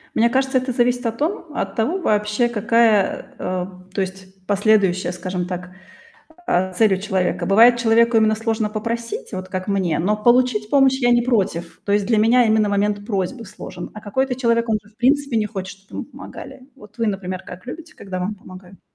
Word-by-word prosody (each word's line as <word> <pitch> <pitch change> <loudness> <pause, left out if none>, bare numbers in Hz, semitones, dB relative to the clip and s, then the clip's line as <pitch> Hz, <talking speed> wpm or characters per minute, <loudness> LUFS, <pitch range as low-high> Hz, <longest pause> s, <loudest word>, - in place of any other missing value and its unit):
Мне 235 +1 +4
кажется, 265 +1 +1
это 255 0 -1
зависит 245 0 +1
от 230 0 -2
том 340 - -2
от 195 -7 -3
того 260 +12 0
вообще, 210 - +1
какая, 225 -2 +2
а, 180 0 -3 0.3
то 200 - -1
есть, 190 0 -7
последующая, 200 -3 +2
скажем 180 0 -4
так, 180 0 -6 0.8
а, 185 +1 +1
цель 210 +1 +3
у - - -1
человека. 190 -3 -1
Бывает, 230 +5 +6
человеку 230 0 +3
именно 220 -1 +4
сложно 220 0 -1
попросить, 230 - -4
вот 185 -1 -5
как 185 +1 -4
мне, 190 -6 0
но 205 +5 +1
получить 235 -1 +2
помощь 270 -2 +4
я 245 -1 +3
не 240 0 +4
против. 195 -8 -1
То 200 - -1
есть 205 -1 +2
для 225 -2 +2
меня 235 +3 +5
именно 215 -1 +3
момент 205 0 0
просьбы 205 +3 -2
сложен, 185 -3 -9
а 215 - -8
какой-то 255 +5 -1
человек, 235 -2 +1
он 220 -1 +2
же, 210 - -21
в - - -39
принципе, 275 +1 +2
не 215 -1 +1
хочет, 195 -2 -7
чтоб 195 - -32
ему - - -5
помогали. - - -11
Вот 210 +1 -16
вы, 230 - 0
например, 185 -2 -3
как 180 +5 -10
любите, 320 +6 -9
когда 190 -2 -6
вам 185 +4 -2
помогают? 185 -1 -14
215 Hz, 195 wpm, -21 LUFS, 190-235 Hz, 0.8 s, Бывает